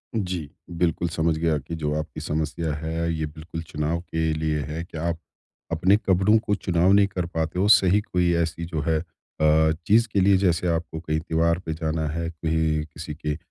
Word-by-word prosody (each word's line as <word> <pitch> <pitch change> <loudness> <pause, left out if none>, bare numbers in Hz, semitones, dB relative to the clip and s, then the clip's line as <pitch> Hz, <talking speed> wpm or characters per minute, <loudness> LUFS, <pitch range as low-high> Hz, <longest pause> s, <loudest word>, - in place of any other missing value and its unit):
जी, 90 -8 -2 0.2
बिल्कुल 85 0 0
समझ 80 0 0
गया 80 -1 +1
कि 75 +4 -6
जो 75 -2 -2
आपकी 75 0 -6
समस्या 80 +1 -2
है। 80 +2 -2
ये 80 -1 -2
बिल्कुल 80 +2 -7
चुनाव 80 0 -2
के 80 -2 -1
लिए 75 0 -1
है 75 +4 -4
कि 85 - -10
आप 85 +1 -2 0.5
अपने 90 +5 +4
कपड़ों 100 +1 +3
को 105 -1 0
चुनाव 90 -1 +2
नहीं 100 0 +5
कर 90 -3 -3
पाते 80 0 -2
हो 100 - +3
सही 100 -1 +6
कोई 90 -4 +1
ऐसी 85 +1 -4
जो 80 -2 -3
है 80 -1 +2 0.4
अ, 80 +1 +4 0.2
चीज़ 115 +3 +5
के 100 - +2
लिए 95 0 +5
जैसे 90 -2 +1
आपको 80 -1 -2
कहीं 80 -1 -1
त्योहार 85 +1 +1
पे 80 - -2
जाना 80 -1 -2
है 85 +2 -3
कहीं 80 -1 0
किसी 75 0 -8
के 75 -1 -3
अ, - - -6
80 Hz, 200 wpm, -24 LUFS, 80-90 Hz, 0.5 s, सही